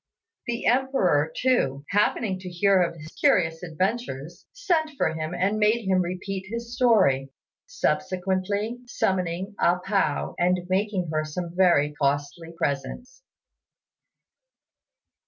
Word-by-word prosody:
The 235 -1 -3
Emperor, 230 - +2
too, 145 - +1
happening 205 -1 +1
to 185 0 -7
hear 190 +2 +3
of 170 -1 0
his 155 -1 -10
curious 160 -1 +2
adventures, 175 - -3
sent 355 -11 0
for 160 - +1
him 160 +2 -4
and 195 +4 0
made 215 0 +2
him 185 -1 +3
repeat 190 +2 -4
his 235 +1 -5
story; 190 - +3 0.4
subsequently, 200 - -1
summoning 190 -2 -1
A 175 +1 +3
pao 190 -5 -1
and 180 +1 +2
making 190 -3 0
her 155 0 +1
some 170 +3 -5
very 170 -6 +3
costly 145 +4 -1
presents. 245 - -3
185 Hz, 120 wpm, -25 LUFS, 160-215 Hz, 0.4 s, hear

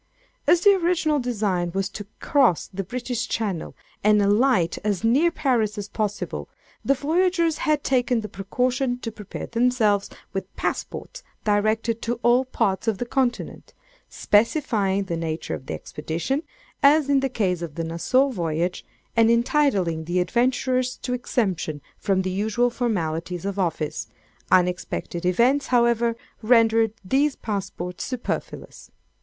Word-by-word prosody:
"As 345 - +5
the 405 - +7
original 340 -5 +1
design 205 -8 -1
was 195 0 0
to 205 0 -8
cross 260 - +3
the 195 +1 -3
British 245 +4 -3
Channel, 200 -7 -3 0.3
and 210 0 +5
alight 205 -3 +3
as 205 -1 -1
near 270 +10 +4
Paris 245 -10 0
as 205 -1 -4
possible, 210 -1 -3 0.3
the 275 - +3
voyagers 335 +3 +1
had 300 -2 +2
taken 245 -3 +1
the 215 - -5
precaution 245 +6 -1
to 225 - -4
prepare 210 -2 -7
themselves 230 -4 +1 0.2
with 195 0 -5
passports - - -4 0.2
directed 215 +2 +1
to 235 0 -2
all 245 +2 +4
parts 200 -5 -1
of 220 -3 +1
the 245 - -3
Continent, 245 -1 -2 0.3
specifying 210 -4 +1
the 175 -3 -3
nature 165 -1 -3
of 130 - -7
the - - -3
expedition, 165 - -3 0.4
as 290 +1 +5
in 280 -1 +4
the 270 0 0
case 185 -8 -1
of 165 -4 -6
the 165 - -2
Nassau 210 +12 +2
voyage, 170 -5 -2 0.3
and 225 -1 +5
entitling 230 - +2
the 175 +2 0
adventurers 255 +6 +1
to 250 - -2
exemption 190 -11 -1 0.2
from 190 -1 +1
the 185 - -2
usual 220 +5 +1
formalities 175 -7 -2
of 200 0 -3
office: 160 -4 -2 0.4
unexpected 180 -1 0
events, 250 +9 +3
however, 235 -1 +2 0.3
rendered 225 -1 +4
these 275 +8 +2
passports 190 -4 -4
superfluous. 255 -2 -5
225 Hz, 140 wpm, -24 LUFS, 190-255 Hz, 0.4 s, the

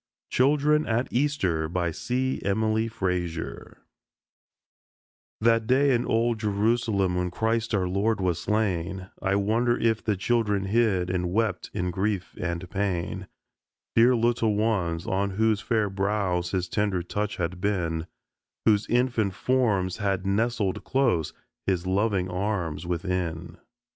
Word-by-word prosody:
CHILDREN 150 +3 +3
AT 115 +3 +1
EASTER 95 - 0 0.2
C. 130 +8 -2
EMILY 110 +2 +1
FRAZIER 90 -6 -4 1.6
That 115 0 +3
day 135 +2 +4
in 120 0 0
old 115 0 +1
Jerusalem 105 -2 +1
when 90 0 0
Christ 110 +3 0
our 95 -2 +1
Lord 100 +4 0
was 90 -3 0
slain, 95 -3 -1
I 95 0 +1
wonder 115 +4 +2
if 115 -1 +1
the 105 -3 0
children 105 -1 +1
hid 95 -4 +1
and 90 -1 -1
wept 105 -2 0
in 90 -3 -1
grief 95 0 -2
and 85 0 -3
pain; 95 0 -2 0.7
Dear 120 +2 +6
little 115 -2 +2
ones, 95 -7 0
on 100 +1 0
whose 110 0 +2
fair 110 -3 +1
brows 95 -3 -1
His 95 -2 -1
tender 100 -4 0
touch 105 +4 -3
had 90 +1 -3
been, 85 -5 -1 0.6
Whose 105 -2 +3
infant 120 -5 +1
forms 105 -9 +1
had 100 -2 -1
nestled 105 0 0
close 90 - +1 0.4
His 90 -2 0
loving 95 0 +1
arms 90 -3 -2
within. 85 -1 -3
100 Hz, 130 wpm, -26 LUFS, 90-115 Hz, 1.6 s, Dear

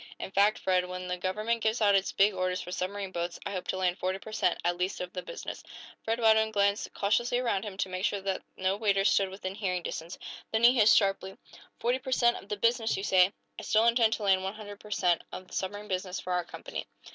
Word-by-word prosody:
In - - -6
fact, 200 +2 +3
Fred, 185 -1 +1
when 180 0 -6
the 180 - -1
government 215 +6 -1
gives 220 +2 +1
out 205 -2 +4
its 195 -1 +2
big 200 +1 +3
orders 185 -1 -1
for 180 - -7
submarine 195 +1 -3
boats, 175 -1 -4
I - - -3
hope 185 -2 -5
to - - -1
land 185 0 0
forty 185 +1 -1
per 215 - -11
cent., 180 -4 +1
at 175 0 +2
least, 180 +2 -2
of 180 0 -5
the 180 - -4
business." - - -7 0.4
Fred 225 +1 -1
Radwin 220 -1 +4
glanced 200 -1 +1
cautiously 240 +4 +1
around 230 -6 0
him, 200 -2 -7
to 195 - -1
make 185 0 -5
sure 200 - +1
that 195 -1 -2 0.2
no 190 +1 +1
waiters 200 -2 +2
stood 195 -1 +2
within 190 0 -6
hearing 185 -4 -2
distance. 165 +1 -6 0.3
Then 220 +1 0
he 240 +1 +8
hissed, 220 -4 +6
sharply: 195 -2 0 0.4
"Forty 245 +2 +1
per 260 0 -7
cent. 240 -2 +4
of 200 - -13
the 210 - -2
business, 230 0 +1
you 195 - -4
say? 185 -1 +4 0.3
I - - -6
still 220 +1 +3
intend 230 -1 +4
to 215 - -4
land 190 -2 +3
one 190 +2 -3
hundred 205 -2 -9
per 210 - -13
cent. 180 -4 +2
of 185 - -8
the - - -16
submarine 205 +2 -4
business 185 -1 -3
for 180 - -4
our 180 -1 0
company?" - - -7
195 Hz, 245 wpm, -29 LUFS, 185-220 Hz, 0.4 s, he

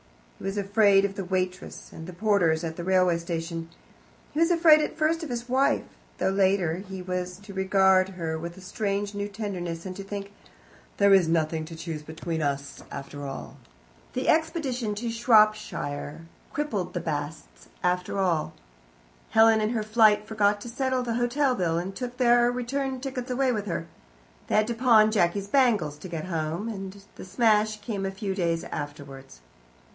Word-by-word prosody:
He - - -9
was 195 +1 -2
afraid 200 0 +4
of 200 - -2
the 195 - -4
waitress 185 0 -3
and 160 0 -9
the 180 - -8
porters 180 -5 +2
at 160 -1 -4
the 170 - -6
railway 185 -2 +3
station. 165 -1 -4 0.6
He 300 - -3
was 330 +1 +4
afraid 330 -3 +6
at 300 - -3
first 320 +1 +1
of 320 - -5
his 240 0 -4
wife, 265 +2 +2 0.3
though 190 - +1
later 190 -4 +2
he 190 -1 -7
was 180 0 -3
to 200 0 -12
regard 190 0 +3
her 160 -2 -3
with 170 +2 -7
a - - -11
strange 200 +1 -2
new 205 0 -3
tenderness, 185 -5 -5
and 185 -1 -5
to 195 - -6
think, 200 0 -6 0.6
"There 200 0 +5
is 190 -4 +5
nothing 160 -1 0
to 165 +1 -9
choose 160 -2 -5
between 160 +1 -4
us, 140 -1 -3
after 140 +1 -7
all." 135 - -7 0.6
The 255 - -2
expedition 285 -9 0
to 230 +2 -3
Shropshire 215 - +2 0.3
crippled 255 -11 -3
the - - 0
Basts 150 0 -5 0.2
permanently. 180 -2 0 0.8
Helen 220 0 +5
in 215 - +1
her 225 -2 -1
flight 215 -1 +4
forgot 210 -2 +1
to 240 - -7
settle 260 +1 -1
the 235 -1 -2
hotel 250 +3 +1
bill, 170 -7 0
and 185 +3 -4
took 250 +1 -5
their 240 -1 +4
return 260 +2 -2
tickets 255 -1 -5
away 255 +1 +1
with 210 -3 -3
her; 170 -2 -3 0.6
they - - 0
had 215 0 +4
to 235 - -2
pawn 225 -3 +5
Jacky's 195 -1 +1
bangles 205 - +2
to 185 - -8
get 165 -2 -4
home, 165 +3 -3
and 195 -2 -7
the - - -8
smash 215 +2 +2
came 200 -3 -3
a - - -1
few 195 0 -4
days 170 -3 0
afterwards. 140 - -8
195 Hz, 175 wpm, -26 LUFS, 170-230 Hz, 0.8 s, afraid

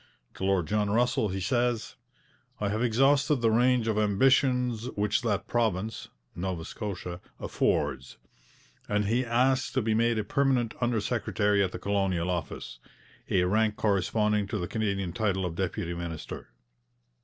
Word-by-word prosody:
To - - -8
Lord 95 -3 +2
John 105 +3 0
Russell 115 -1 +2
he 95 +1 -3
says: 120 +2 0 0.6
'I 105 - 0
have 110 +3 -1
exhausted 135 +5 +3
the 115 -4 +1
range 120 0 +3
of 110 -1 +1
ambitions 125 +2 +2
which 105 +3 +1
that 105 -5 -1
province 110 -2 -1 0.3
[Nova 90 -2 -4
Scotia] 90 -4 -6 0.2
affords'; 65 -1 -1 0.7
and 105 0 +1
he 120 +5 +1
asks 130 +2 +1
to 130 - +1
be 110 0 +1
made 115 +1 +2
a 110 - 0
permanent 125 0 +1
under 120 -2 +1
secretary 105 -2 +1
at 95 - -1
the - - -5
Colonial 95 -3 0
Office, 70 -8 -5 0.5
a 90 - +3
rank 105 +3 +2
corresponding 105 +1 +1
to 110 - -3
the 90 -3 -3
Canadian 100 -5 -2
title 95 -3 0
of 85 - -3
deputy 85 -1 -3
minister. 85 -2 -6
105 Hz, 150 wpm, -28 LUFS, 95-120 Hz, 0.7 s, exhausted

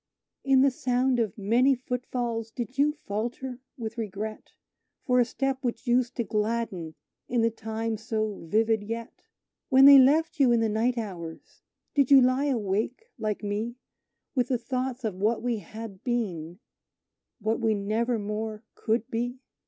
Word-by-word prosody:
"In 270 -1 +5
the 275 - +4
sound 250 0 +1
of 220 -3 -1
many 240 +7 +3
footfalls, 245 -2 -3
did 240 +2 -6
you 295 +1 +4
falter 240 +5 -4 0.2
with 230 -1 -5
regret 215 0 -5 0.5
For 250 -1 +3
a 245 - +5
step 270 +2 -2
which 240 0 -3
used 245 0 +2
to 235 - 0
gladden 210 -7 -2 0.3
in 240 -1 +2
the 230 - +3
time 225 0 -3
so 215 -1 -2
vivid 220 +3 +2
yet? 230 +2 -6 0.5
When 265 +1 +7
they 280 -1 +11
left 305 +5 +4
you 265 -3 +5
in 235 - +4
the 225 -1 +1
night 230 +4 +1
hours, 175 -7 -7 0.3
did 280 -3 +3
you 275 -1 +9
lie 255 +2 +3
awake 235 - -1
like 215 -1 -2
me, 210 +4 -2 0.6
With 250 -4 +1
the 255 - +1
thoughts 255 +1 -3
of 220 -3 -1
what 215 +6 0
we 240 -3 0
had 215 -2 -9
been 180 -9 -2 0.8
what 220 +2 0
we 225 -2 +2
never 220 +4 0
more 215 +1 -4
could 225 +1 -1
be? 245 +2 -2
230 Hz, 160 wpm, -27 LUFS, 215-250 Hz, 0.8 s, they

